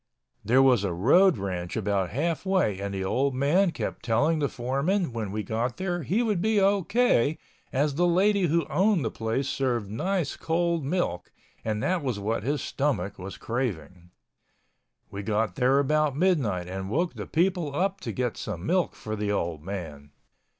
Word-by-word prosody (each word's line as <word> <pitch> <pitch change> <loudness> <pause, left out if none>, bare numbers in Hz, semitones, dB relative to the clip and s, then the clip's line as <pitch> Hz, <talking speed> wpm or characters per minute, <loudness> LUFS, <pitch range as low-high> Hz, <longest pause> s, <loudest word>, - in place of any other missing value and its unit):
There 125 +6 +4
was 125 -6 +4
a 100 - -1
road 160 - +4
ranch 90 -2 -4
about 100 -3 0
half 155 - -1
way 185 - +1
and 100 0 -3
the 95 -1 -3
old 130 +7 0
man 160 +9 +3
kept - - -5
telling 145 +8 +2
the 145 -2 0
foreman 140 - -1
when 110 -4 -3
we 105 +1 -3
got 120 +3 -2
there 175 -2 -2
he 190 - 0
would 210 -6 0
be 215 +1 +2
O.K. 195 - +2 0.3
as 145 +2 +1
the 175 +5 +2
lady 190 +2 +3
who 165 +1 +1
owned 185 - +2
the 110 - -1
place 115 +5 -2
served 120 -8 -1
nice 180 - -1
cold 170 -1 0
milk 140 - -2 0.3
and 110 -1 -2
that 185 -1 +1
was 130 -6 -2
what 105 +3 -1
his 140 +6 -1
stomach 125 -10 -2
was 95 +1 -7
craving. 95 -8 -4 1.0
We 100 - -5
got 110 +1 0
there 130 +1 +3
about 145 0 +2
midnight 135 - +1
and 95 +1 -5
woke 170 - 0
the - - -7
people 170 -4 0
up 195 +4 0
to - - -4
get 125 -3 -2
some 95 -4 -5
milk 180 +6 +1
for 110 0 -5
the 105 -1 -2
old 85 -6 -2
man. 80 -6 -7
135 Hz, 180 wpm, -27 LUFS, 105-175 Hz, 1.0 s, There